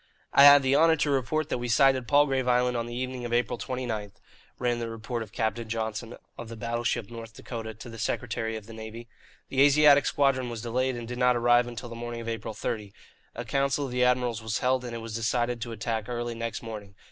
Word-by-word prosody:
"I 140 Hz, -, +8 dB
have 145 Hz, -1 st, +9 dB
the 135 Hz, +1 st, +3 dB
honour 165 Hz, +2 st, +5 dB
to 150 Hz, -1 st, 0 dB
report 145 Hz, +3 st, 0 dB
that -, -, -1 dB
we 120 Hz, -, -3 dB
sighted 130 Hz, 0 st, +3 dB
Palgrave 135 Hz, -3 st, +3 dB
Island 125 Hz, 0 st, +2 dB
on 115 Hz, 0 st, -2 dB
the 120 Hz, -, -6 dB
evening 130 Hz, 0 st, -4 dB
of 120 Hz, -, -5 dB
April 120 Hz, -1 st, 0 dB
29," 115 Hz, -6 st, -4 dB, 0.5 s
ran 120 Hz, -1 st, 0 dB
the 115 Hz, -1 st, -3 dB
report 115 Hz, +1 st, -5 dB
of 110 Hz, -2 st, -7 dB
Captain 110 Hz, +1 st, -2 dB
Johnson, 110 Hz, +1 st, -4 dB, 0.2 s
of 120 Hz, -, -7 dB
the 115 Hz, -, -7 dB
battleship 120 Hz, -1 st, -2 dB
North 115 Hz, -1 st, -9 dB
Dakota, 110 Hz, -2 st, -7 dB
to 110 Hz, -, -11 dB
the 115 Hz, -1 st, -9 dB
Secretary 115 Hz, -1 st, -2 dB
of 110 Hz, -2 st, -7 dB
the 115 Hz, -, -11 dB
Navy. 110 Hz, +1 st, -8 dB, 0.4 s
"The 135 Hz, -, +1 dB
Asiatic 145 Hz, 0 st, +6 dB
Squadron 135 Hz, -3 st, +1 dB
was 115 Hz, -1 st, -6 dB
delayed 130 Hz, +2 st, 0 dB
and 120 Hz, -1 st, -6 dB
did 125 Hz, +1 st, -6 dB
not 125 Hz, 0 st, +4 dB
arrive 120 Hz, 0 st, +4 dB
until 120 Hz, 0 st, -7 dB
the -, -, -8 dB
morning 120 Hz, 0 st, -6 dB
of 115 Hz, -, -7 dB
April 115 Hz, -1 st, -4 dB
30. 105 Hz, -3 st, -4 dB, 0.4 s
A 120 Hz, -, -5 dB
council 140 Hz, +4 st, 0 dB
of 130 Hz, -, -6 dB
the 125 Hz, 0 st, +1 dB
admirals 125 Hz, -3 st, +1 dB
was 110 Hz, -1 st, -2 dB
held, 130 Hz, 0 st, +1 dB
and 120 Hz, -1 st, -6 dB
it 115 Hz, -, -5 dB
was 115 Hz, -1 st, -7 dB
decided 120 Hz, +1 st, -1 dB
to 115 Hz, -, -4 dB
attack 110 Hz, 0 st, -3 dB
early 120 Hz, -1 st, -3 dB
next 115 Hz, 0 st, -5 dB
morning. 105 Hz, -3 st, -8 dB
120 Hz, 230 wpm, -27 LUFS, 115-125 Hz, 0.5 s, have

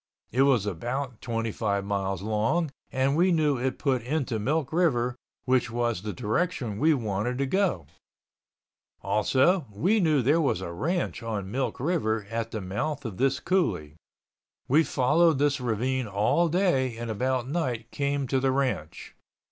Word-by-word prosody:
It 130 Hz, -, +2 dB
was 135 Hz, -7 st, +4 dB
about 120 Hz, +6 st, -4 dB
25 115 Hz, -4 st, -2 dB
miles 100 Hz, -2 st, -2 dB
long 110 Hz, +10 st, 0 dB, 0.2 s
and 135 Hz, +2 st, +1 dB
we 180 Hz, +3 st, +3 dB
knew 150 Hz, -5 st, +2 dB
it 130 Hz, +1 st, -1 dB
put 130 Hz, -4 st, 0 dB
into 130 Hz, -2 st, -2 dB
Milk 140 Hz, +6 st, -1 dB
River 125 Hz, -8 st, +2 dB, 0.3 s
which 125 Hz, -2 st, +2 dB
was 120 Hz, -4 st, -1 dB
the 105 Hz, +1 st, -4 dB
direction 120 Hz, -, -2 dB
we 160 Hz, +4 st, +4 dB
wanted 115 Hz, 0 st, -2 dB
to 140 Hz, -, 0 dB
go, 135 Hz, -, 0 dB, 1.2 s
also 135 Hz, -, +2 dB
we 185 Hz, -, +2 dB
knew 155 Hz, -7 st, +3 dB
there 150 Hz, +7 st, +3 dB
was 140 Hz, -, +1 dB
a 95 Hz, -2 st, -5 dB
ranch 170 Hz, -, -2 dB
on 105 Hz, -4 st, -4 dB
Milk 130 Hz, +3 st, -2 dB
River 115 Hz, -, 0 dB
at 115 Hz, 0 st, -2 dB
the 110 Hz, -, -4 dB
mouth 135 Hz, +10 st, -3 dB
of 105 Hz, -5 st, -5 dB
this 135 Hz, 0 st, +1 dB
coulee. 95 Hz, -, 0 dB, 0.7 s
We 150 Hz, +5 st, +5 dB
followed 155 Hz, +4 st, +3 dB
this 145 Hz, -1 st, +1 dB
ravine 125 Hz, +2 st, -1 dB
all 105 Hz, -, +2 dB
day 140 Hz, -9 st, +1 dB
and 115 Hz, -1 st, -4 dB
about 125 Hz, +3 st, -1 dB
night 125 Hz, -7 st, -2 dB
came 140 Hz, -1 st, -1 dB
to 135 Hz, -, +2 dB
the 135 Hz, 0 st, +2 dB
ranch. 130 Hz, -, -2 dB
130 Hz, 155 wpm, -27 LUFS, 110-145 Hz, 1.2 s, We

